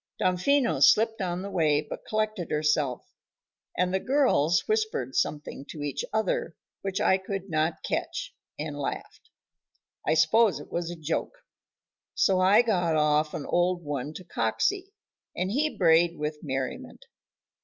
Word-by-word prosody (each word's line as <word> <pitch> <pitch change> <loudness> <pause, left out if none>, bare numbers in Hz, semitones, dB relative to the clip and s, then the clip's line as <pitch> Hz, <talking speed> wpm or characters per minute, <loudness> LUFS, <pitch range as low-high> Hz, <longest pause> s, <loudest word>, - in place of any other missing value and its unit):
Damfino 235 +9 +2
slipped 225 0 +4
on 180 0 -2
the 200 - -6
way 155 -5 +2
but - - -7
collected 215 -5 -2
herself, 150 -4 0 0.7
and 180 +1 +1
the 190 - +2
"girls" 250 - +2
whispered 435 - -1
something 145 -2 -2
to 150 - -6
each 145 -2 -3
other, 215 -6 -1 0.3
which 195 -1 -3
I 190 - +3
could 195 0 -5
not 160 +1 0
catch, - - -3 0.2
and 150 -1 -5
laughed. 140 - -6 0.8
I - - +3
suppose 175 +3 +4
it 145 - -12
was 170 -1 -2
a 175 - -5
joke, 165 - -4 0.7
so 190 -2 +3
I 195 +5 +5
got 175 -8 +1
off 150 0 +2
an 145 - -5
old 175 0 +1
one 145 0 -4
to 185 - -8
Coxey, 180 - -1 0.4
and 185 +1 -1
he 300 +6 0
brayed 170 -1 +4
with 150 0 -3
merriment. 135 -3 -5
175 Hz, 145 wpm, -27 LUFS, 150-210 Hz, 0.8 s, I